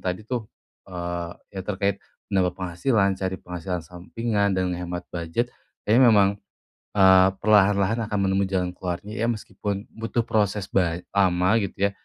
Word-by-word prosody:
tadi, 90 +3 -3
tuh, 115 -2 -4 0.4
eee, 85 -1 -4 0.2
yang 95 -2 -6
terkait 100 -1 0 0.3
menambah 95 -2 +1
penghasilan, 95 +2 0
cari 95 0 -2
penghasilan 90 -1 -5
sampingan, 100 +4 -1
dan 90 -1 0
ngehemat 90 0 -4
budget, 85 +8 -2 0.3
kayaknya 120 +4 +5
memang, 100 -3 +6 0.6
eee, 95 -2 +6
perlahan-lahan 105 +1 +3
akan 105 -2 -1
menemui 95 +1 +2
jalan 90 -2 -1
keluarnya, 95 +4 -5
ya. - - +2
Meskipun, 105 -2 -4
butuh 115 +1 -1
proses 105 -2 0
bany 85 -2 +1
lama, 95 +1 +3
gitu 100 0 0
ya, - - -8
95 Hz, 145 wpm, -24 LUFS, 90-105 Hz, 0.6 s, memang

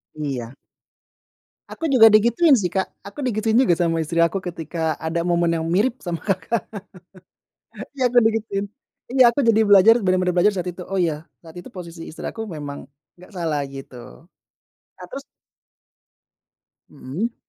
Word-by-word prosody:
Iya. 135 -5 -5 1.2
Aku 325 - -3
juga 245 -5 +7
di 215 - +7
gituin 240 +8 +3
sih, 200 -9 +2
Kak, 190 +1 -1 0.2
aku 200 +8 -11
di 250 - 0
gituin 220 +1 +1
juga 255 -8 +4
sama 170 -1 0
istri 165 +1 0
aku 170 +3 +2
ketika 165 -3 -3
ada 165 +1 -2
momen 175 -1 +1
yang 160 - -3
mirip 205 +10 +1
sama 170 -2 -4
Kakak, 215 +3 -1 1.4
iya 260 - -1
aku 245 - +5
di 225 -1 +4
gituin, 205 -2 -3 0.5
iya 260 +1 +5
aku 285 - -1
jadi 220 -1 +4
belajar 205 +2 +7
benar 185 0 +2
benar 180 -1 0
belajar 195 +4 +4
saat 180 -2 -4
itu, 180 0 -7
oh 195 +1 -2
ya 160 -3 -1 0.2
saat 165 -1 -15
itu 175 - -9
posisi 170 -3 -9
istri 155 - -10
aku 225 - -6
memang 150 -8 -7 0.3
nggak 180 +4 -17
salah 160 -6 -2
gitu. 135 -2 -10 1.0
Nah - - -8
terus - - -8 1.7
Mhm. 200 - -5
180 Hz, 165 wpm, -22 LUFS, 165-220 Hz, 1.7 s, juga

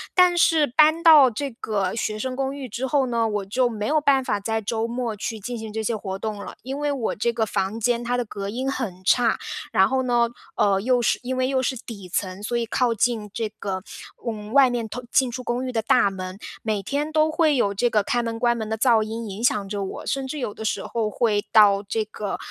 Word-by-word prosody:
但 360 -1 +5
是 325 -3 +4
搬 310 +5 +4
到 305 -6 +8
这 275 +5 -4
个 205 -5 -2
学 215 -1 -2
生 255 +4 -3
公 270 +1 -2
寓 270 -3 -7
之 245 +5 -3
后 270 -1 +2
呢， 230 -2 +1
我 210 -2 -2
就 245 +6 +1
没 215 -3 -4
有 305 +5 +2
办 280 -3 +3
法 205 - -1
在 220 +2 -2
周 220 +2 -2
末 235 -2 -3
去 220 +2 -4
进 240 +4 -5
行 220 -1 -7
这 220 0 -2
些 220 +1 -1
活 190 -2 -5
动 215 +1 -4
了。 200 - -8
因 265 +3 -5
为 295 0 0
我 250 -5 -2
这 235 +3 -1
个 230 -2 0
房 200 0 -2
间 235 +1 +1
它 240 +1 -1
的 245 - 0
隔 200 -3 -6
音 - - -6 0.2
很 190 -9 -5
差， 230 +4 +3 0.3
然 190 - +4
后 265 0 +1
呢， 240 -2 +2 0.3
呃， 195 -2 +3
又 245 +3 +2
是 - - +1
因 255 +1 -2
为 255 0 +1
又 265 -1 +1
是 260 +1 -1
底 215 -5 -9
层， 185 +2 -3
所 240 - -2
以 235 -1 0
靠 240 +1 +1
近 225 -1 0
这 225 -1 -2
个， 200 -3 -5 0.5
嗯， 215 -1 -5
外 270 -2 +6
面 235 -2 -2
通 250 +4 -7
进 260 -2 +3
出 255 +1 -6
公 245 +1 -2
寓 255 - -3
的 225 -2 0
大 205 -2 +3
门， 185 0 -6 0.2
每 215 -3 -2
天 290 +8 -2
都 310 0 +3
会 310 -2 +3
有 205 -6 +1
这 240 +5 +1
个 210 -3 +2
开 240 +4 0
门 230 -1 -3
关 240 0 +2
门 220 -2 -4
的 220 - -2
噪 230 -1 +4
音 225 +1 -4
影 200 +4 -6
响 210 -5 +2
着 200 -1 -3
我。 190 - -6
甚 270 -1 -2
至 300 - -5
有 245 -7 -3
的 - - -8
时 220 - -1
候 225 -2 -1
会 210 -1 +1
到 205 -2 +6
这 215 +2 -2
个， 210 -1 -5
230 Hz, 265 characters per minute, -23 LUFS, 210-255 Hz, 0.5 s, 到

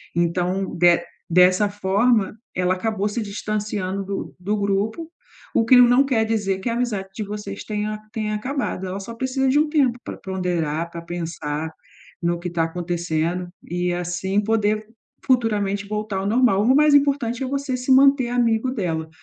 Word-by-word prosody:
Então 180 +3 0
de 175 0 +5 0.3
dessa 180 +4 +5
forma, 205 +2 +1 0.2
ela 180 0 +1
acabou 210 +1 -1
se 220 +3 -3
distanciando 205 -2 -3
do 195 0 -5
do 200 +4 -1
grupo. 205 +11 -1 0.4
O 225 - +3
que 255 - +6
não 245 +2 +6
quer 245 -5 +2
dizer 205 -4 -1
que 215 - -3
a - - -1
amizade 225 -6 -2
de 215 - -3
vocês 205 -1 -6
tenha 215 0 -3
tenha 215 -2 -2
acabado. 245 -4 -3
Ela 185 +2 -4
só 230 +4 -8
precisa 260 +2 0
de 270 - +3
um 310 - +3
tempo 270 -6 +2
para - - -7
ponderar 170 -4 -2
para 170 - -7
pensar 160 -2 -4 0.5
no 170 0 0
que 175 +1 -4
tá 170 -1 0
acontecendo 175 0 -2
e 175 0 -2
assim 175 +3 -1
poder 215 0 0 0.4
futuramente 205 -6 +1
voltar 210 -1 -3
ao 190 +1 -2
normal. 225 -3 +3
O 255 +4 +4
mais 300 0 +5
importante 275 -4 +2
é - - -2
você 275 -1 -2
se 250 +1 -1
manter 270 -1 +5
amigo 240 0 +1
dela 165 -9 -2
205 Hz, 170 wpm, -22 LUFS, 180-240 Hz, 0.5 s, que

